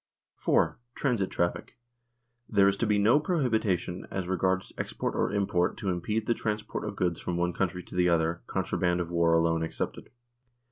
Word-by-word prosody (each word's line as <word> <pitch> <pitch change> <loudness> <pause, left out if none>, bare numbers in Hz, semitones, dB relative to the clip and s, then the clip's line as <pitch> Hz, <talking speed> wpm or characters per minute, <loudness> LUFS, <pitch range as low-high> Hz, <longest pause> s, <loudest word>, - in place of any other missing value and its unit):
4. - - +1 0.2
Transit 115 -9 0
traffic. 85 +7 -2 0.7
There 100 -2 +5
is 100 - +3
to 115 - 0
be 105 -1 +3
no 110 +8 +5
prohibi 125 - +1
tion 90 +1 -7
as 95 -2 -3
regards 95 +1 0
export - - -2
or - - 0
import 95 -3 +1
to 100 - -2
impede 105 +5 -1
the 115 - +2
transport 105 -2 -3
of - - -4
goods 90 -2 0
from 90 - -3
one 90 0 0
country 90 -1 -2
to - - -14
the 90 0 +3
other, 80 0 +1
contraband 90 -1 0
of 85 -1 -3
war 85 -1 +3
alone 80 0 +2
excepted. 80 - -4
95 Hz, 180 wpm, -28 LUFS, 85-105 Hz, 0.7 s, There